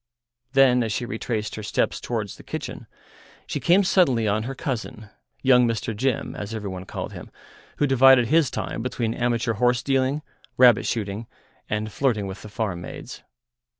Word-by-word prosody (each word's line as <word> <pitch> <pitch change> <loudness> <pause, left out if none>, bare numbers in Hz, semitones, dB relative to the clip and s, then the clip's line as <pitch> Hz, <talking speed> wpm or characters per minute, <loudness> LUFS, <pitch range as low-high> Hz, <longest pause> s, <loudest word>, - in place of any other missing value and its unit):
Then, 130 -2 +5
as 115 -2 -1
she 120 - -2
retraced 110 -3 -3
her 110 - -5
steps 105 - -1
towards 110 -5 -3
the - - -13
kitchen, - - -6 0.6
she - - -3
came 180 +4 +4
suddenly 135 - +3
on 105 +1 +1
her 135 - -5
cousin, 110 -5 -5 0.3
young 125 -2 +5
Mr. 115 -1 -2
Jim, 130 +2 -1
as 105 +2 -5
every 105 -3 -4
one 95 0 -7
called - - -6
him, - - -9 0.5
who 145 - +2
divided 135 -2 +6
his 160 -3 +4
time 115 - -4
between 115 -2 -2
amateur 120 -1 0
horse 120 +2 +1
dealing, 135 +2 +1 0.3
rabbit 125 -4 +6
shooting, 105 0 -3 0.4
and 105 0 -2
flirting 110 -1 0
with 95 +1 -7
the 105 - -10
farm 100 -4 -3
maids. - - -9
115 Hz, 170 wpm, -24 LUFS, 105-130 Hz, 0.6 s, divided